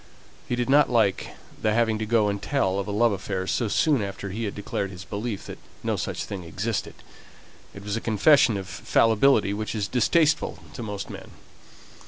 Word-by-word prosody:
He 120 - +1
did 120 0 -1
not 145 +2 +5
like 115 -6 +2 0.3
the 110 - +2
having 115 -2 +2
to 110 - -3
go 110 -2 +3
and 100 -1 -2
tell 100 -10 0
of 100 - -3
a - - -3
love 115 +3 +3
affair 95 -1 -3
so 115 +4 0
soon 140 +4 +2
after 100 0 -5
he 110 +4 -3
had 100 - -4
declared 100 -1 -3
his 95 0 -10
belief 105 0 -4
that - - -8 0.2
no - - 0
such - - -3
thing 95 -3 -6
existed; 100 +7 -3 0.8
it 100 - -9
was 105 0 -3
a 115 - -3
confession 115 +1 +4
of 95 -2 -6
fallibility 110 -2 +3
which 110 +2 -4
is 105 -2 -1
distasteful 150 +7 +2 0.2
to - - -7
most 105 -3 -5
men. - - -9
105 Hz, 195 wpm, -25 LUFS, 100-120 Hz, 0.8 s, not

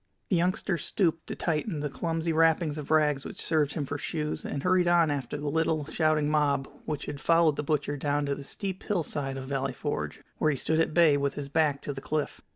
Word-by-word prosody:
The 190 - +3
youngster 175 +1 0
stooped 165 -5 0
to - - -4
tighten 160 +1 -1
the 150 - -1
clumsy 165 +4 -2
wrappings 160 -1 +3
of 145 - -7
rags 150 -3 +3
which - - -8
served 150 -3 +1
him 150 -4 -1
for 145 +1 -4
shoes, 150 0 -3
and 140 - -4
hurried 180 -1 +3
on 170 -3 +4
after 140 -1 -3
the 145 0 -4
little, 155 0 +1
shouting 155 -1 +1
mob 150 -3 +2 0.2
which 150 -2 -3
had 145 -1 -6
followed 165 -2 +4
the - - -2
butcher 145 -1 -1
down 145 +1 0
to 140 - 0
the 140 - -6
steep 190 +5 -4
hillside 145 -8 -2
of 130 - -5
Valley 135 -1 -2
Forge, 145 +3 -4 0.2
where 155 - +3
he 145 - 0
stood 160 +5 0
at 160 -1 +1
bay 165 -4 +6
with 140 -1 -1
his 140 -1 -5
back 145 -2 +1
to 145 - -3
the 135 - -7
cliff. 150 0 -2
150 Hz, 225 wpm, -28 LUFS, 145-165 Hz, 0.2 s, bay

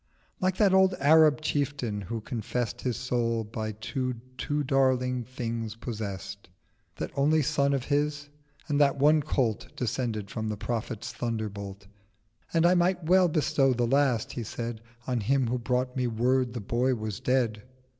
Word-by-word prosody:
Like 185 -1 0
that 200 -3 +4
old 190 -1 +5
Arab 155 0 +5
Chieftain, 140 -8 -1
who 110 +4 -5
confess'd 120 +1 -3
His 125 -5 -1
soul 115 -2 0
by 110 0 -4
two 125 +4 -3 0.2
too 145 +3 -1
Darling 130 -2 +2
Things 115 -3 -4
possess'd— 100 -5 -6 0.5
That - - -4
only 150 +2 +3
Son 140 +1 +2
of 135 -3 0
his: 145 0 0 0.4
and 145 -1 +1
that 140 -1 +4
one 150 +3 +5
Colt 125 -7 -1
Descended 115 -4 -2
from 110 -1 -3
the 105 - -3
Prophet's 115 -1 -4
Thunderbolt. 100 -4 -4 0.7
"And 165 0 +3
I 175 - +6
might 180 0 +2
well 180 +3 +5
bestow 140 -4 +2
the 120 0 +1
last," 130 -2 +2
he 120 - -4
said, 115 0 -5 0.3
950 - - -2
"On 125 - +1
him 130 +4 +1
who 125 - 0
brought 125 +1 -1
me 125 -1 0
Word 125 +2 +1
the 120 - -4
Boy 125 +5 +1
was 110 -3 -4
dead." 120 -5 +1
125 Hz, 165 wpm, -28 LUFS, 115-145 Hz, 0.7 s, I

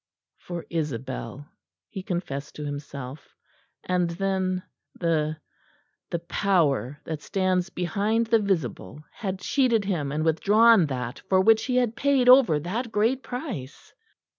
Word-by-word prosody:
For 175 -2 -7
Isabel, 135 -3 -4 0.4
he 190 - -7
confessed 160 -6 -4
to 150 - -6
himself; 140 -1 -7 0.5
and 180 -1 0
then 185 +1 -1 0.4
the 155 -2 0 0.7
the - - -1
Power 165 -6 0
that 160 -2 -5
stands 185 -1 0
behind 205 +7 0
the 225 0 +3
visible 190 -6 -2
had 195 -3 -3
cheated 235 -1 +1
him 160 -8 -1
and 155 +2 -1
withdrawn 205 +4 +5
that 125 -3 -4
for 190 - +4
which 220 +3 +4
he 250 - -1
had 245 -3 +1
paid 275 -3 +2
over 250 - +7
that 220 - -3
great 230 +6 +1
price. 245 - -7
180 Hz, 130 wpm, -25 LUFS, 150-215 Hz, 0.7 s, over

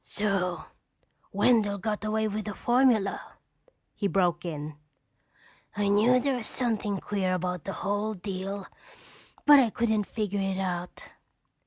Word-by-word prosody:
"So 180 -5 -1 0.7
Wendell 210 -5 +3
got 210 +2 -3
away 220 0 0
with 215 0 -3
the 210 -2 -5
formula?" 240 -5 +2 0.6
he 200 - -1
broke 180 -3 +1
in. 150 -2 -5 1.0
"I 205 -1 +1
knew 225 +5 +4
there 270 0 0
was 225 - -5
something 220 -5 -1
queer 190 -1 -1
about 180 -1 -3
the 195 - -3
whole 205 +3 -2
deal 195 +1 -5 0.8
but 290 -1 +9
I 245 -4 +4
couldn't 220 -2 0
figure 205 -2 -2
it 195 -1 -1
out. 180 -2 -4
205 Hz, 135 wpm, -28 LUFS, 185-220 Hz, 1.0 s, but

